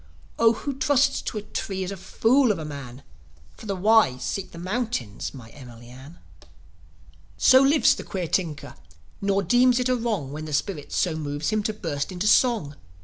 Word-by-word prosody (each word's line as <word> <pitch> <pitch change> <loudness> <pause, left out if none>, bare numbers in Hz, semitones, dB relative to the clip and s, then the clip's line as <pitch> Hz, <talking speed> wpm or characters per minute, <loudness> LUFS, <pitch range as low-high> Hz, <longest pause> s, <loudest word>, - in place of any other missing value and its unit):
Oh, 230 0 +5
who 280 +5 -5
trusts 270 +1 +2
to - - -5
a 210 - -4
tree 190 -2 -4
is 185 - -5
a - - -5
fool 235 +6 +2
of 200 - -2
a 160 - -6
man! 140 -3 -9 0.5
For - - -12
the 200 - -2
wise 185 - +3
seek 195 - -3
the - - -12
mountains, 185 - -3
my 120 -5 -12
Emily 120 -4 -13
Ann." 130 +6 -13 1.2
So 260 - +6
lives 280 +2 +4
the - - -7
queer 185 -3 -4
tinker, 160 -4 -2 0.5
nor 200 0 +1
deems 245 +6 +4
it 250 0 0
a 255 - +3
wrong, 215 - -2
When 155 +2 -6
the 155 - -7
spirit 150 0 -3
so 175 - 0
moves 145 -1 -3
him, 215 0 +1
to 215 +1 -2
burst 160 -6 -4
into 185 +2 -4
song. 210 - +2
190 Hz, 190 wpm, -24 LUFS, 145-225 Hz, 1.2 s, So